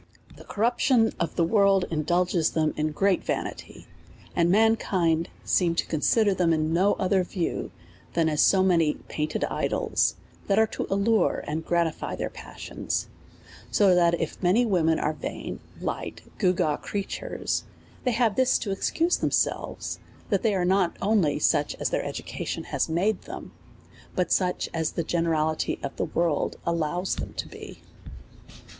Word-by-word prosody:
The - - -14
corruption 235 +1 +2
of 170 -2 -2
the 170 - +2
world 195 +1 +4
indulges 175 +2 +1
them 155 -1 +1
in 155 0 -1
great 190 +4 +1
vanity; - - -4 0.5
and 170 -1 +3
mankind 185 -6 +2 0.2
seem 170 -2 +2
to - - 0
consider 200 +7 +2
them 175 -3 +2
in 155 0 0
no 190 +4 +3
other 190 0 +1
view, 180 -1 -3 0.5
than 165 -1 +3
as 150 -2 +2
so 190 -1 +5
many 165 -5 +3
painted 155 0 -2
idols, - - 0 0.3
that 200 - +2
are 220 - +6
to - - -5
allure 200 +1 +2
and 155 +2 -3
gratify 170 -2 0
their - - -4
passions; - - -5 0.6
so 200 -3 +4
that 170 -1 +3
if 165 - -4
many 195 +7 +3
wo 190 -6 +2
men 160 0 +3
are 155 - 0
vain, - - -6 0.2
light, - - -4 0.2
gewgaw 180 -6 +2
creatures, 205 - -3 0.4
they 255 - +1
have 230 -3 +2
this 260 -1 +3
to 200 - -4
excuse 330 - +1
themselves, - - -1 0.3
that 195 -3 +2
they 215 -3 +2
are 180 -2 +1
not 185 -1 +2
only 195 -8 +2
such 145 0 +1
as - - -2
their - - 0
education - - -5
has - - -1
made 185 +5 +1
them, - - -8 0.6
but 180 - 0
such 180 -1 +1
as 160 -2 -1
the 170 - -1
gene 170 +1 0
rality 155 -1 0
of 140 - -4
the - - 0
world 165 -3 0
allows 170 +2 -1
them - - -5
to - - -4
be. - - -11
180 Hz, 160 wpm, -26 LUFS, 160-200 Hz, 0.6 s, are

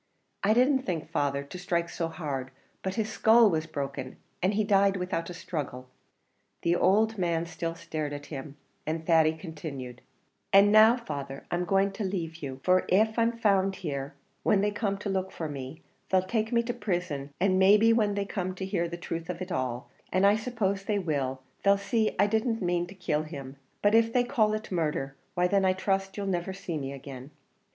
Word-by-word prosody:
I 210 +2 +4
didn't 265 +3 +4
think, 175 -11 -3
father, 140 -3 0
to 160 +6 -9
strike 170 -2 0
so 165 - -3
hard, 145 -5 -4 0.3
but 190 0 -3
his 220 -2 0
skull 220 0 +5
was 160 -1 -1
broken, 140 -3 -5 0.2
and 190 +3 +2
he 215 - +2
died 200 -1 +3
without 180 -2 -2
a - - -6
struggle." 130 -7 -5 0.7
The 170 +1 +3
old 215 +4 +3
man 170 -2 0
still 165 -1 -4
stared 155 -3 -4
at 145 0 -6
him, 140 0 -8 0.3
and 160 +1 -2
Thady 160 -2 +4
continued, 145 -7 -7 0.5
"And 200 +1 +7
now, 220 +3 +7
father, 140 - -6
I - - +1
am 175 +1 -1
going 195 +2 +2
to 210 +2 -5
lave 170 -4 -3
you; 135 -4 -7
for 185 0 +2
av 215 +4 +4
I'm 230 0 +3
found 195 -3 +2
here, 140 -6 -5 0.3
when 205 -3 +3
they 210 +1 +1
come 205 -1 -1
to 205 - -6
look 190 -1 -1
for 160 - -4
me, 140 +2 -7 0.3
they'll 185 -1 +3
take 220 +3 -1
me 235 -1 +3
to 240 +1 -2
prison, 175 -10 -3
and 185 0 +3
may 195 +2 +7
be 225 +2 +5
when 210 -3 +2
they 200 0 -1
come 185 -2 -3
to 190 - -4
hear 185 -3 -1
the 170 - -5
truth 165 -1 -5
of 175 -1 -4
it 185 0 -6
all, 125 -4 -2 0.2
and 185 +1 +3
I 200 +1 +6
suppose 215 -4 -1
they 205 +1 0
will, 140 -7 -2 0.2
they'll 200 0 +4
see 220 +2 0
I 200 - +5
didn't 220 +2 0
mane 175 -1 0
to 195 - -12
kill 160 -5 -1
him; 140 -3 -8 0.3
but 205 +1 +4
if 230 0 +4
they 245 +1 +3
call 220 -4 +2
it 215 -1 -6
murdher, 150 -6 -1 0.2
why 180 0 +2
then 195 +1 +2
I 185 0 +4
trust 195 +1 -1
you'll 200 - -2
niver 190 0 -2
see 175 -4 -4
me 135 -1 -4
agin." 135 -1 -9
185 Hz, 210 wpm, -28 LUFS, 155-205 Hz, 0.7 s, And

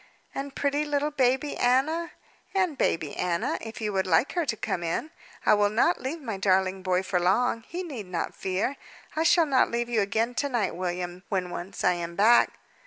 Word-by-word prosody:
"And 275 0 -5
pretty 285 +1 0
little 295 0 0
baby 265 +1 +1
Anna?" 310 +8 +1 0.4
"And 370 -5 +1
baby 160 - 0
Anna, 170 -1 -1
if 225 +1 -8
you 210 -1 -1
would 190 -1 0
like 175 - +3
her 345 -4 0
to 225 - -1
come 175 - -2
in. 170 - -2 0.3
I - - +6
will 205 -1 +4
not 215 +3 +2
leave 290 +6 -3
my 220 -6 -3
darling 190 0 +2
boy 185 0 +1
for 185 -1 0
long; 230 +7 +2
he 355 +2 -4
need 260 - -7
not 175 -2 -3
fear. 190 +9 -2 0.4
I 315 - 0
shall 335 0 +5
not 270 -4 +3
leave 235 0 -2
you 230 -3 +2
again 225 +4 0
to 285 - -2
night, 240 -5 0
William, 175 0 -4
when 185 -2 -1
once 175 +3 -6
I 180 - +4
am 170 -1 -5
back." 225 +5 +5
225 Hz, 200 wpm, -27 LUFS, 185-280 Hz, 0.4 s, I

